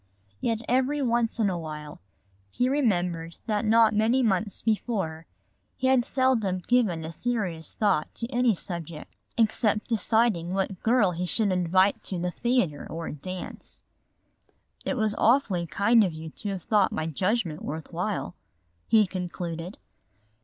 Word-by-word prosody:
Yet 225 - -1
every 260 +4 +1
once 235 -1 +1
in 220 -3 +2
a 180 -3 -1
while 150 - -8 0.5
he 245 - 0
remembered 180 - 0
that 215 0 0
not 220 0 +5
many 225 +5 +3
months 205 -2 0
before 195 -8 -1 0.5
he 260 - -3
had 260 -2 +4
seldom 245 -8 +1
given 205 -10 +2
a 160 - -5
serious 185 -5 -3
thought 200 -8 +1
to 230 - -2
any 245 -3 +3
subject 170 -3 -6 0.2
except 215 -1 +2
deciding 220 -6 +1
what 195 -1 -2
girl 225 -5 +3
he 180 +1 -3
should 210 +1 +2
invite 185 +2 +2
to 185 - -3
the 175 +1 -2
theater 235 - 0
or 165 0 -5
a - - -5
dance. 185 +5 -7 1.0
"It 270 - -1
was 215 -2 +1
awfully 220 -8 +3
kind 210 +8 +4
of 180 -5 -1
you 160 0 -8
to 205 - -6
have 190 -3 -4
thought 210 -3 +3
my 155 - -2
judgment 180 - -1
worth 155 +1 -6
while," - - -2 0.5
he 220 -2 +5
concluded. 175 -1 -5
200 Hz, 150 wpm, -27 LUFS, 170-230 Hz, 1.0 s, not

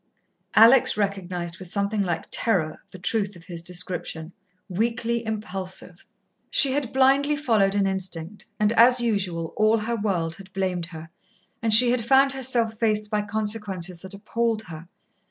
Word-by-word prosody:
Alex 230 +3 +6
recognized 185 -4 -3
with 185 - -9
something 200 +3 -1
like 175 -4 -2
terror 170 -9 0
the - - -11
truth 200 +2 -1
of 170 - -14
his 170 -1 -7
description. 175 -1 -5 0.3
Weakly 230 +4 -1
impulsive. 195 -4 -6 0.4
She 275 - +2
had 270 -3 -2
blindly 275 +3 +3
followed 220 -9 +1
an 200 -1 +2
instinct, 190 -1 -3
and, 210 0 +2
as 240 +2 +6
usual, 190 -8 -1
all 215 +1 +3
her 225 +2 -2
world 180 -7 -2
had 195 -1 -13
blamed 185 -3 -2
her 160 -1 -11 0.5
and 225 0 0
she 240 +3 +7
had 245 -2 0
found 270 +3 +4
herself 240 -4 0
faced 215 -2 0
by 210 -1 +1
consequences 205 -4 -2
that 190 +1 -10
appalled 225 +2 -2
her. 165 -3 -10
205 Hz, 155 wpm, -24 LUFS, 180-230 Hz, 0.5 s, she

